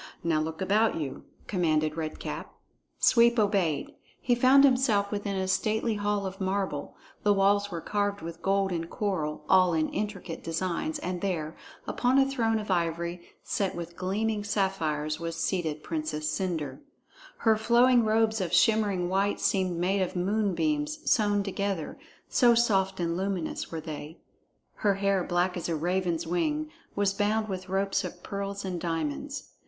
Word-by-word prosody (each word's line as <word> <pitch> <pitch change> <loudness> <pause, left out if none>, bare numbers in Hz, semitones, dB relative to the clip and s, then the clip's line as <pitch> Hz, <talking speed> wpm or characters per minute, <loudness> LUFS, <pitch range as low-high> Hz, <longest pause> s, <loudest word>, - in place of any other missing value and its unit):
"Now 160 -2 +2
look 160 +2 -4
about 215 +4 +3
you," 145 -5 -5 0.2
commanded 155 -5 +1
Red 155 -1 -4
Cap. - - -6 0.4
Sweep 235 0 +5
obeyed. 200 -8 +1 0.3
He 245 - +1
found 260 +3 +6
himself 250 -7 +3
within 205 -1 -2
a 190 0 -1
stately 220 +4 +1
hall 205 -1 -1
of 190 +1 -6
marble; 190 -6 -2 0.3
the 205 -1 +3
walls 200 +1 +3
were 170 -3 -5
carved 205 +1 -1
with 165 0 -7
gold 195 0 +1
and 165 -1 -3
coral, 170 -8 -2
all 185 -2 +5
in 155 -1 +1
intricate 195 -4 -4
designs, 185 - -2
and 180 -9 -4
there, 165 -5 -2 0.3
upon 250 +2 +2
a 270 - +6
throne 230 -5 +1
of 210 -2 -4
ivory 170 0 -1 0.2
set 195 -2 -1
with 170 0 -6
gleaming 205 +4 -1
sapphires, 165 -7 -1
was 165 0 -4
seated 165 -3 -2
Princess 155 -1 -3
Cendre. 155 -7 -2 0.6
Her 225 -1 +3
flowing 240 +2 +4
robes 220 0 +2
of 175 -3 -2
shimmering 200 -1 +3
white 195 +2 +1
seemed 185 -3 +1
made 190 +3 +1
of 185 - -2
moonbeams 220 - 0
sewn 205 -3 +3
together, 195 -4 -3 0.3
so 240 -2 +4
soft 195 -5 +2
and 170 -1 0
luminous 190 -2 -3
were 165 - -3
they. 155 0 -7 0.6
Her 200 -2 +2
hair, 195 -1 +1
black 175 +1 0
as 175 -1 -4
a 165 - 0
raven's 175 0 -1
wing, 300 - -1 0.2
was 200 -1 +2
bound 215 +2 0
with 185 -2 -5
ropes 195 +1 0
of 180 -1 -7
pearls 200 0 -4
and 180 -3 -3
diamonds. 165 - -3
190 Hz, 160 wpm, -28 LUFS, 170-210 Hz, 0.6 s, found